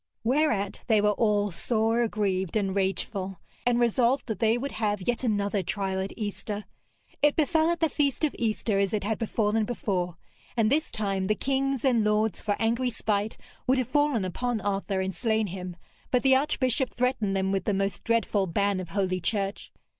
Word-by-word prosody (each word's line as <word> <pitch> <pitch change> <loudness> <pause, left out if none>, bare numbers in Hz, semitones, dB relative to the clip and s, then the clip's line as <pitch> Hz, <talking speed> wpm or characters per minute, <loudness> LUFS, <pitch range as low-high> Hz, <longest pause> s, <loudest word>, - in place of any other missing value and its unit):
Whereat 235 -5 +1
they 220 -3 +4
were 210 0 +3
all 205 -1 +1
sore 225 +5 +1
aggrieved 195 -5 -1
and 195 -2 0
rageful, 195 -1 -2 0.3
and 240 -1 +3
resolved 240 +2 +2
that 220 -5 -4
they 225 +1 +3
would 275 +3 -3
have 205 -4 -2
yet 240 +1 0
another 205 -3 +1
trial 190 +1 -2
at 190 +1 -3
Easter. 210 -1 -4 0.6
It 295 0 +4
befell 320 +1 +2
at 340 0 -1
the 325 - +4
feast 285 0 0
of 305 - +1
Easter 215 -2 0
as 200 +1 +1
it 205 - -2
had 220 +2 -1
befallen 220 -1 +1
before, 185 -6 -2 0.4
and 225 0 +3
this 305 +2 +2
time 195 -3 -1
the 215 - +2
kings 275 0 0
and 240 -4 +3
lords 210 0 +1
for 205 -2 0
angry 235 +3 +1
spite 215 -2 -1 0.3
would 260 +1 +4
have 255 -1 -1
fallen 290 -7 +2
upon 240 +5 -2
Arthur 195 -1 -1
and 190 0 -2
slain 220 -1 +1
him, 180 -2 -6 0.3
but 250 -1 +2
the 265 -1 +6
archbishop 265 -2 +1
threatened 240 -5 0
them 190 0 0
with 195 -2 -1
the - - +1
most 195 0 -1
dreadful 225 -4 +1
ban 200 +3 +1
of 185 - -6
Holy 185 -2 0
Church. 195 +2 -2
215 Hz, 185 wpm, -27 LUFS, 195-245 Hz, 0.6 s, the